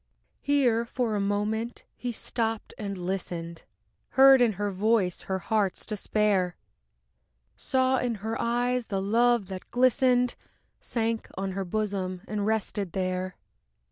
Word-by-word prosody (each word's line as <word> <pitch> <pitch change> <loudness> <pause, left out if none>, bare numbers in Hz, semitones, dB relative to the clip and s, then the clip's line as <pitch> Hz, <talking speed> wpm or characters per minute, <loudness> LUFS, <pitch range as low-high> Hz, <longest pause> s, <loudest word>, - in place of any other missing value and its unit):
Here 255 -5 +3
for 235 -1 -2
a 205 - 0
moment 210 +4 -1
he 245 - -4
stopped 225 -1 -3
and 200 -2 -5
listened, 175 -2 -4 0.6
Heard 270 -1 +8
in 235 -3 +4
her 205 +1 -2
voice 195 -2 +1
her 190 - +1
heart's 200 0 0
despair, 205 -4 +1 1.0
Saw 260 -1 +1
in 245 -2 -1
her 225 +1 -1
eyes 245 +1 0
the 195 -2 -1
love 230 +2 +3
that 190 -1 -7
glistened, 250 0 +3 0.5
Sank 225 -1 -2
on 195 0 -2
her 195 0 -3
bosom 190 -2 -2
and 205 0 -2
rested 205 -4 -1
there. 185 0 -2
215 Hz, 130 wpm, -27 LUFS, 190-240 Hz, 1.0 s, Heard